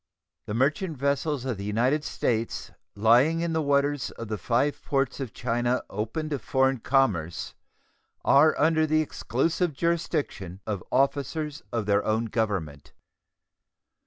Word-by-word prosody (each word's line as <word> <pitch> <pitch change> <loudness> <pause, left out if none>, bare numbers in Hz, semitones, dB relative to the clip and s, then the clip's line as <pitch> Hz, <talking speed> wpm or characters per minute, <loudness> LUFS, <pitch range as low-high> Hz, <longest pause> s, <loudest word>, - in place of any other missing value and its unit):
The 105 - -3
merchant 150 +6 0
vessels 140 0 0
of 125 -5 -2
the 100 - -6
United 125 +9 +1
States 115 -4 -2 0.2
lying 120 +10 +4
in 170 -1 -1
the 160 - +1
waters 140 -1 +1
of 115 -2 -8
the 110 - -2
five 125 +9 0
ports 135 -1 0
of 130 -5 -4
China 120 +2 -1
open 110 +10 -3
to 145 -3 -2
foreign 130 +2 +1
commerce 110 - 0 0.7
are 150 +3 +5
under 160 +1 +3
the 155 +1 +3
exclusive 155 +4 -1
jurisdiction 145 - -2
of 105 -4 -3
officers 145 +2 0
of 115 -3 -1
their 100 0 +2
own 110 +1 0
Government. 100 -11 -3
135 Hz, 135 wpm, -26 LUFS, 110-150 Hz, 0.7 s, are